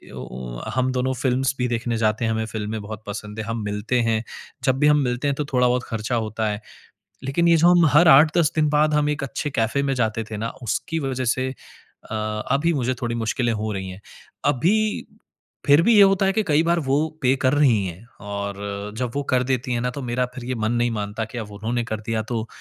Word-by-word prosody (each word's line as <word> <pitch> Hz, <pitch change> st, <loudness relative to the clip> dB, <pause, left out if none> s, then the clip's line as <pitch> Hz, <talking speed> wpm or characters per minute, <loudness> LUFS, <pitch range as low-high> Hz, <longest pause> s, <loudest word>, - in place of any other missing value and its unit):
ओ -, -, -6 dB
ओ -, -, -7 dB, 0.2 s
हम 130 Hz, 0 st, +1 dB
दोनों 130 Hz, +1 st, 0 dB
फिल्म्स 130 Hz, 0 st, +1 dB
भी 125 Hz, -, 0 dB
देखने 120 Hz, -1 st, -1 dB
जाते 110 Hz, +1 st, +1 dB
हैं, 110 Hz, -, +1 dB
हमें 110 Hz, 0 st, -1 dB
फिल्में 110 Hz, 0 st, -4 dB
बहुत 110 Hz, +1 st, -8 dB
पसंद 105 Hz, +1 st, -6 dB
है, 110 Hz, -, -3 dB
हम 115 Hz, 0 st, -3 dB
मिलते 105 Hz, +4 st, -1 dB
हैं, 115 Hz, -1 st, +1 dB, 0.4 s
जब 130 Hz, 0 st, +2 dB
भी 150 Hz, -, +4 dB
हम 150 Hz, -, +5 dB
मिलते 125 Hz, +3 st, -1 dB
हैं 140 Hz, -, +1 dB
तो 150 Hz, -, -2 dB
थोड़ा-बहुत 125 Hz, 0 st, +3 dB
खर्चा 115 Hz, +2 st, -3 dB
होता 110 Hz, -1 st, -1 dB
है। 105 Hz, +1 st, -4 dB, 0.6 s
लेकिन 170 Hz, +6 st, +1 dB
ये 170 Hz, -, +6 dB
जो 170 Hz, +2 st, +5 dB
हम 175 Hz, -1 st, +5 dB
हर 170 Hz, +1 st, +7 dB
8-10 150 Hz, +3 st, +6 dB
दिन 155 Hz, -1 st, +2 dB
बाद 150 Hz, +1 st, +3 dB
हम 150 Hz, 0 st, +2 dB
एक 150 Hz, +1 st, -3 dB
अच्छे 140 Hz, +3 st, -3 dB
कैफ़े 115 Hz, +2 st, 0 dB
में 135 Hz, -1 st, 0 dB
जाते 115 Hz, -2 st, -1 dB
थे 110 Hz, -, -4 dB
ना, 110 Hz, +2 st, -3 dB
उसकी 160 Hz, +8 st, -2 dB
वजह 130 Hz, -1 st, -2 dB
से 130 Hz, +2 st, 0 dB, 0.6 s
अ, -, -, -3 dB, 0.4 s
अभी 145 Hz, +6 st, +2 dB
मुझे 130 Hz, -2 st, 0 dB
थोड़ी 120 Hz, -1 st, -2 dB
मुश्किलें 115 Hz, +1 st, 0 dB
हो 110 Hz, 0 st, -2 dB
रही 95 Hz, -1 st, -4 dB
है। 95 Hz, -, -10 dB, 0.5 s
अभी, 200 Hz, -, +1 dB, 0.6 s
फिर 145 Hz, +2 st, +7 dB
भी 230 Hz, +6 st, +4 dB
ये 205 Hz, -, +8 dB
होता 195 Hz, 0 st, +4 dB
है 195 Hz, -, +3 dB
कि 220 Hz, -, +1 dB
कई 150 Hz, +1 st, +4 dB
बार 170 Hz, +1 st, +2 dB
वो 135 Hz, -1 st, +1 dB, 0.3 s
पे 130 Hz, +1 st, +4 dB
कर 130 Hz, +1 st, +3 dB
रहीं 125 Hz, -9 st, +3 dB
है, 90 Hz, +4 st, -8 dB, 0.2 s
और 100 Hz, 0 st, -5 dB
जब 125 Hz, -1 st, -1 dB
वो 145 Hz, -, -1 dB
कर 125 Hz, -1 st, +3 dB
देती 125 Hz, 0 st, -1 dB
है 120 Hz, -, 0 dB
ना 125 Hz, +1 st, -1 dB
तो 140 Hz, +2 st, -6 dB
मेरा 125 Hz, +1 st, -1 dB
फिर 125 Hz, -, -7 dB
ये 130 Hz, +1 st, -2 dB
मन 110 Hz, -1 st, -1 dB
नहीं 120 Hz, 0 st, +1 dB
मानता 105 Hz, 0 st, -3 dB
कि 115 Hz, +3 st, -8 dB
अब 110 Hz, -3 st, -6 dB
उन्होंने 115 Hz, +3 st, -2 dB
कर 110 Hz, -1 st, -4 dB
दिया 110 Hz, 0 st, -2 dB
तो 115 Hz, 0 st, -3 dB
120 Hz, 235 wpm, -23 LUFS, 110-140 Hz, 0.6 s, ये